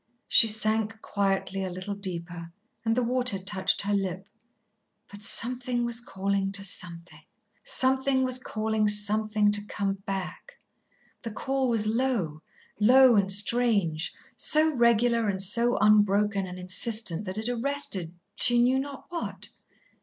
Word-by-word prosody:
She 225 Hz, -, +6 dB
sank 220 Hz, 0 st, 0 dB
quietly 195 Hz, -1 st, -2 dB
a 190 Hz, -, -3 dB
little 185 Hz, +3 st, -6 dB
deeper 175 Hz, -3 st, -7 dB, 0.3 s
and 225 Hz, 0 st, 0 dB
the 250 Hz, -, +2 dB
water 250 Hz, -3 st, +2 dB
touched 190 Hz, +1 st, +1 dB
her 205 Hz, +1 st, -1 dB
lip. 190 Hz, -1 st, -3 dB, 0.8 s
But 205 Hz, 0 st, -12 dB
Something 245 Hz, +3 st, -1 dB
was 235 Hz, -1 st, 0 dB
calling 195 Hz, -3 st, -2 dB
to 200 Hz, 0 st, 0 dB
Something, 175 Hz, -2 st, -7 dB, 0.4 s
something 265 Hz, -, +1 dB
was 255 Hz, 0 st, -1 dB
calling 220 Hz, -3 st, -1 dB
something 210 Hz, 0 st, +2 dB
to 205 Hz, 0 st, 0 dB
come 195 Hz, -1 st, -3 dB
back. 195 Hz, -, -6 dB, 0.7 s
The 230 Hz, -, -6 dB
call 265 Hz, +4 st, -2 dB
was 225 Hz, -3 st, 0 dB
low, 220 Hz, -, -1 dB, 0.4 s
low 250 Hz, +3 st, +6 dB
and 195 Hz, -2 st, +3 dB
strange, 200 Hz, -6 st, +2 dB, 0.2 s
so 310 Hz, +1 st, +3 dB
regular 235 Hz, -1 st, +2 dB
and 195 Hz, -2 st, -2 dB
so 235 Hz, +5 st, +2 dB
unbroken 205 Hz, -1 st, +2 dB
and 180 Hz, 0 st, -8 dB
insistent, 185 Hz, 0 st, -2 dB
that 185 Hz, +1 st, -4 dB
it 220 Hz, +1 st, -2 dB
arrested, 240 Hz, -9 st, -3 dB, 0.2 s
she 240 Hz, 0 st, +4 dB
knew 255 Hz, +2 st, +3 dB
not 275 Hz, 0 st, -7 dB
what. 345 Hz, -1 st, -4 dB
215 Hz, 140 wpm, -26 LUFS, 195-240 Hz, 0.8 s, She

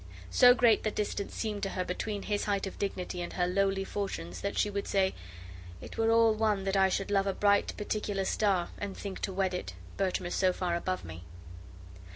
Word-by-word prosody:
So 245 Hz, -1 st, +7 dB
great 235 Hz, -4 st, +4 dB
the 215 Hz, -, 0 dB
distance 205 Hz, -1 st, -3 dB
seemed 210 Hz, -2 st, -3 dB
to 195 Hz, -, -1 dB
her 185 Hz, -1 st, -2 dB
between 200 Hz, +3 st, -3 dB
his 205 Hz, -1 st, -1 dB
height 200 Hz, -1 st, 0 dB
of 195 Hz, -, -7 dB
dignity 185 Hz, -2 st, -3 dB
and 175 Hz, -, -5 dB
her 180 Hz, -, +1 dB
lowly 195 Hz, +1 st, +1 dB
fortunes 140 Hz, -, -4 dB
that 200 Hz, -, -3 dB
she -, -, +3 dB
would 200 Hz, -1 st, -3 dB
say: 190 Hz, -1 st, +2 dB, 0.7 s
"It -, -, -10 dB
were 225 Hz, 0 st, +2 dB
all 225 Hz, -1 st, +5 dB
one 215 Hz, -2 st, +1 dB
that 195 Hz, 0 st, -1 dB
I 190 Hz, -1 st, +4 dB
should 195 Hz, +2 st, -2 dB
love 195 Hz, -1 st, +2 dB
a 195 Hz, -, +1 dB
bright 205 Hz, +1 st, +2 dB
particular 205 Hz, -2 st, -2 dB
star, 190 Hz, -4 st, +1 dB
and 200 Hz, -1 st, -5 dB
think 195 Hz, -2 st, -6 dB
to -, -, -2 dB
wed 190 Hz, -1 st, 0 dB
it, 180 Hz, -, -5 dB, 0.2 s
Bertram 185 Hz, -1 st, 0 dB
is 175 Hz, -, -3 dB
so 185 Hz, -1 st, +2 dB
far 180 Hz, -2 st, -2 dB
above 185 Hz, -, -2 dB
me." 85 Hz, +1 st, -9 dB
195 Hz, 210 wpm, -30 LUFS, 185-205 Hz, 0.7 s, So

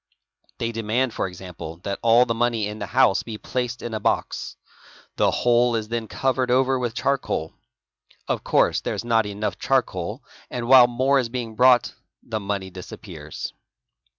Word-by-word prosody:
They 115 Hz, -1 st, -2 dB
demand 115 Hz, +2 st, -1 dB
for -, -, -1 dB
example 85 Hz, -3 st, -9 dB
that 100 Hz, -1 st, -3 dB
all 115 Hz, +2 st, +5 dB
the 115 Hz, -, -1 dB
money 115 Hz, -2 st, 0 dB
in 105 Hz, +1 st, -6 dB
the 100 Hz, -, -4 dB
house 125 Hz, -3 st, +3 dB
be 110 Hz, -2 st, -7 dB
placed 125 Hz, +2 st, -3 dB
in 120 Hz, -, -5 dB
a 110 Hz, -, -2 dB
box. -, -, -1 dB, 0.6 s
The -, -, +4 dB
whole 120 Hz, 0 st, +3 dB
is 110 Hz, -1 st, -3 dB
then 115 Hz, -1 st, -3 dB
covered 130 Hz, +2 st, 0 dB
over 130 Hz, +1 st, +3 dB
with 120 Hz, -2 st, -2 dB
charcoal. 130 Hz, -, -1 dB, 0.7 s
Of -, -, -1 dB
course -, -, +2 dB
there -, -, -3 dB
is -, -, -5 dB
not 115 Hz, -2 st, +2 dB
enough 105 Hz, +1 st, -3 dB
charcoal 115 Hz, -10 st, -1 dB, 0.3 s
and 120 Hz, -1 st, -4 dB
while 130 Hz, -1 st, +8 dB
more 130 Hz, +3 st, +2 dB
is 120 Hz, -3 st, -1 dB
being 115 Hz, -2 st, -5 dB
brought 125 Hz, 0 st, +5 dB, 0.3 s
the 110 Hz, -, -3 dB
money 100 Hz, -2 st, -3 dB
disappears. 90 Hz, -4 st, -8 dB
115 Hz, 170 wpm, -23 LUFS, 105-125 Hz, 0.7 s, while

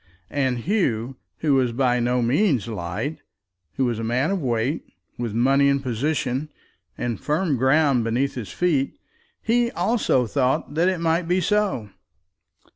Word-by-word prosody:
And 130 Hz, -3 st, 0 dB
Hugh, 130 Hz, -, 0 dB, 0.2 s
who 150 Hz, -3 st, +2 dB
was 130 Hz, -3 st, +2 dB
by 125 Hz, 0 st, +2 dB
no 120 Hz, +1 st, +1 dB
means 130 Hz, -, +2 dB
light, 110 Hz, -, -4 dB, 0.6 s
who 135 Hz, -, +1 dB
was 120 Hz, -2 st, -1 dB
a -, -, -3 dB
man 125 Hz, +9 st, 0 dB
of 195 Hz, -3 st, -1 dB
weight, 125 Hz, +3 st, -1 dB, 0.4 s
with 115 Hz, -3 st, -3 dB
money 135 Hz, +4 st, +4 dB
and 140 Hz, 0 st, +1 dB
position 130 Hz, +2 st, -1 dB, 0.5 s
and 120 Hz, -3 st, -3 dB
firm 155 Hz, 0 st, 0 dB
ground 135 Hz, 0 st, +3 dB
beneath 125 Hz, +5 st, 0 dB
his 120 Hz, -6 st, -6 dB
feet, 150 Hz, -7 st, 0 dB, 0.5 s
he 235 Hz, +1 st, +2 dB
also 225 Hz, -, +1 dB
thought 130 Hz, +3 st, 0 dB
that 170 Hz, +4 st, +3 dB
it 185 Hz, -3 st, -2 dB
might 165 Hz, +1 st, +1 dB
be 180 Hz, +2 st, +2 dB
so. 195 Hz, -, 0 dB
135 Hz, 150 wpm, -23 LUFS, 120-160 Hz, 0.6 s, money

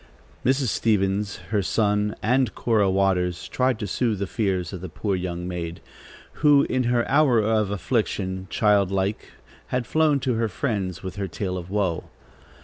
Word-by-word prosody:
Mrs. 130 Hz, -1 st, +2 dB
Stevens, 100 Hz, -1 st, +1 dB, 0.2 s
her 105 Hz, -2 st, +2 dB
son 105 Hz, +1 st, +1 dB
and 125 Hz, +1 st, +2 dB
Cora 110 Hz, -4 st, +2 dB
Waters 95 Hz, -2 st, +1 dB
tried 130 Hz, -2 st, +1 dB
to 105 Hz, -, -4 dB
soothe 110 Hz, +2 st, 0 dB
the 100 Hz, -, -2 dB
fears 95 Hz, -3 st, -1 dB
of 90 Hz, -, -6 dB
the 95 Hz, -, -6 dB
poor 100 Hz, +5 st, -2 dB
young 90 Hz, -1 st, -4 dB
maid, 85 Hz, -2 st, -5 dB, 0.6 s
who, 145 Hz, -2 st, +6 dB
in 130 Hz, -1 st, 0 dB
her 120 Hz, 0 st, +1 dB
hour 140 Hz, -3 st, +4 dB
of 110 Hz, -1 st, +1 dB
affliction, 95 Hz, -2 st, -2 dB
childlike, 100 Hz, -1 st, +1 dB, 0.4 s
had 125 Hz, -1 st, -1 dB
flown 155 Hz, +2 st, +2 dB
to 130 Hz, -1 st, 0 dB
her 115 Hz, -1 st, 0 dB
friends 100 Hz, -, -3 dB
with 95 Hz, +1 st, -6 dB
her 100 Hz, -1 st, -2 dB
tale 90 Hz, +1 st, -3 dB
of 90 Hz, -1 st, -6 dB
woe. 95 Hz, -4 st, -1 dB
105 Hz, 160 wpm, -24 LUFS, 95-115 Hz, 0.6 s, who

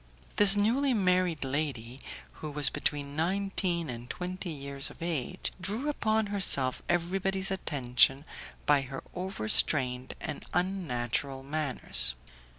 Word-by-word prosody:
This 205 Hz, -1 st, +8 dB
newly 245 Hz, +6 st, +2 dB
married 180 Hz, -5 st, +1 dB
lady, 135 Hz, -3 st, -3 dB, 0.4 s
who 155 Hz, -, -5 dB
was 145 Hz, -2 st, +2 dB
between 145 Hz, -1 st, -2 dB
nineteen 180 Hz, 0 st, 0 dB
and 120 Hz, -1 st, -8 dB
twenty 185 Hz, 0 st, -5 dB
years 140 Hz, -2 st, -3 dB
of -, -, -15 dB
age, 165 Hz, 0 st, -3 dB
drew 215 Hz, +11 st, -2 dB
upon 220 Hz, -6 st, 0 dB
herself 135 Hz, -10 st, 0 dB
everybody's 190 Hz, +3 st, 0 dB
attention 135 Hz, -5 st, +2 dB, 0.4 s
by 145 Hz, -1 st, +4 dB
her 135 Hz, 0 st, -8 dB
over 185 Hz, -, -5 dB
strained 125 Hz, 0 st, +2 dB
and 150 Hz, -2 st, -6 dB
unnatural 140 Hz, -8 st, -2 dB
manners. 140 Hz, -, +4 dB
155 Hz, 120 wpm, -29 LUFS, 135-190 Hz, 0.4 s, This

